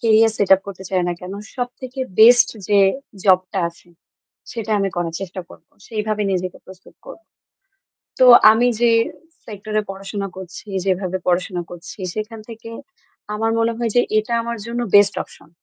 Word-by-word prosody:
career 225 Hz, -1 st, +4 dB
set 200 Hz, -, +1 dB
up 190 Hz, -, -3 dB
করতে 190 Hz, -1 st, -8 dB
চাই 185 Hz, -1 st, +1 dB
না 175 Hz, -, 0 dB
কেন 180 Hz, +1 st, -7 dB, 0.2 s
সবথেকে 250 Hz, +1 st, -5 dB, 0.2 s
best 235 Hz, +2 st, +7 dB, 0.2 s
যে 205 Hz, -1 st, +4 dB, 0.5 s
job 185 Hz, -2 st, +6 dB
টা 195 Hz, -, -2 dB
আছে 170 Hz, +1 st, -19 dB, 0.6 s
সেটা 225 Hz, -2 st, -5 dB
আমি 195 Hz, -, 0 dB
করার 170 Hz, -1 st, -2 dB
চেষ্টা 190 Hz, -1 st, -6 dB
করব। -, -, -16 dB, 0.2 s
সেইভাবে 215 Hz, -1 st, -2 dB
নিজেকে 185 Hz, 0 st, -3 dB
প্রস্তুত 190 Hz, 0 st, -15 dB
করব। -, -, -11 dB, 1.0 s
তো 255 Hz, -, +7 dB, 0.3 s
আমি 240 Hz, +3 st, +3 dB
যে 240 Hz, -1 st, +5 dB, 0.5 s
sector 215 Hz, 0 st, -8 dB
এ -, -, 0 dB
পড়াশোনা 195 Hz, +1 st, -5 dB
করছি, 190 Hz, +3 st, -10 dB, 0.2 s
যেভাবে 185 Hz, -1 st, -1 dB
পড়াশোনা 180 Hz, 0 st, 0 dB
করছি 175 Hz, +4 st, -11 dB
সেখান 215 Hz, +1 st, -5 dB
থেকে 225 Hz, 0 st, -10 dB, 0.6 s
আমার 225 Hz, +1 st, 0 dB
মনে 230 Hz, 0 st, +1 dB
হয় 235 Hz, -1 st, -1 dB
যে 245 Hz, -, +6 dB, 0.2 s
এটা 225 Hz, +2 st, -4 dB
আমার 235 Hz, 0 st, -4 dB
জন্য 235 Hz, +1 st, -3 dB
best 205 Hz, 0 st, +6 dB
option। 150 Hz, -, -19 dB
205 Hz, 165 wpm, -20 LUFS, 185-230 Hz, 1.0 s, best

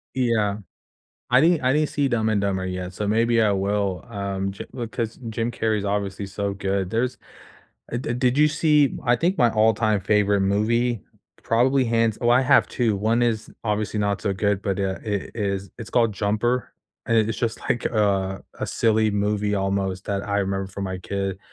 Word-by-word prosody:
Yeah. 110 Hz, -5 st, +1 dB, 0.7 s
I 125 Hz, +1 st, +5 dB
didn 165 Hz, +1 st, +4 dB
I 130 Hz, 0 st, +2 dB
didn't 150 Hz, +1 st, +2 dB
see 145 Hz, -1 st, 0 dB
Dumb 115 Hz, -4 st, +1 dB
and 110 Hz, -2 st, +1 dB
Dumber 95 Hz, -2 st, -1 dB
yet, 90 Hz, 0 st, -4 dB
so 105 Hz, 0 st, -3 dB
maybe 115 Hz, +1 st, +3 dB
I 105 Hz, -, +3 dB
will, 100 Hz, -2 st, -1 dB
um, 100 Hz, -2 st, -3 dB
cha 100 Hz, -, -8 dB
because 115 Hz, -2 st, -4 dB
Jim 115 Hz, +1 st, -2 dB
Carrey's 110 Hz, -3 st, -1 dB
obviously 100 Hz, 0 st, -2 dB
so 100 Hz, 0 st, -3 dB
good. 95 Hz, -1 st, -1 dB
There's 120 Hz, +3 st, -1 dB, 0.7 s
uh, -, -, 0 dB
di 120 Hz, -1 st, -3 dB
did 125 Hz, +2 st, +1 dB
you 150 Hz, -, +6 dB
see 150 Hz, -2 st, +3 dB
I 120 Hz, 0 st, +3 dB
think 175 Hz, +9 st, 0 dB
my 120 Hz, -6 st, +4 dB
all-time 110 Hz, -1 st, +2 dB
favorite 100 Hz, 0 st, +2 dB
movie, 115 Hz, +3 st, +1 dB, 0.4 s
probably 130 Hz, +4 st, +2 dB
hands 115 Hz, -2 st, +1 dB
oh, 120 Hz, -, +2 dB
I 125 Hz, +2 st, +5 dB
have 140 Hz, +2 st, +4 dB
2, 115 Hz, -4 st, 0 dB
one 110 Hz, +4 st, +1 dB
is, 110 Hz, -2 st, 0 dB
obviously 105 Hz, -1 st, -1 dB
not 100 Hz, -1 st, 0 dB
so 100 Hz, -, 0 dB
good, 100 Hz, 0 st, 0 dB
but 100 Hz, -1 st, -1 dB
yeah, 95 Hz, -1 st, -1 dB
it 105 Hz, -3 st, -3 dB
is 100 Hz, -3 st, -2 dB
it's 115 Hz, -3 st, -8 dB
called 115 Hz, -3 st, +2 dB
Jumper, 110 Hz, +5 st, -1 dB, 0.3 s
and 115 Hz, -, +2 dB
it's 110 Hz, 0 st, +2 dB
just, 115 Hz, -2 st, -1 dB
like, 120 Hz, -, 0 dB
uh, 100 Hz, -3 st, +1 dB, 0.2 s
a -, -, -1 dB
silly 110 Hz, -1 st, +2 dB
movie, 105 Hz, 0 st, 0 dB
almost, 95 Hz, -1 st, -1 dB
that 100 Hz, -1 st, -2 dB
I 100 Hz, -, 0 dB
remember 95 Hz, 0 st, -1 dB
from 100 Hz, +1 st, -5 dB
my 95 Hz, -1 st, -4 dB
kid 95 Hz, +1 st, -3 dB
105 Hz, 190 wpm, -23 LUFS, 100-120 Hz, 0.7 s, you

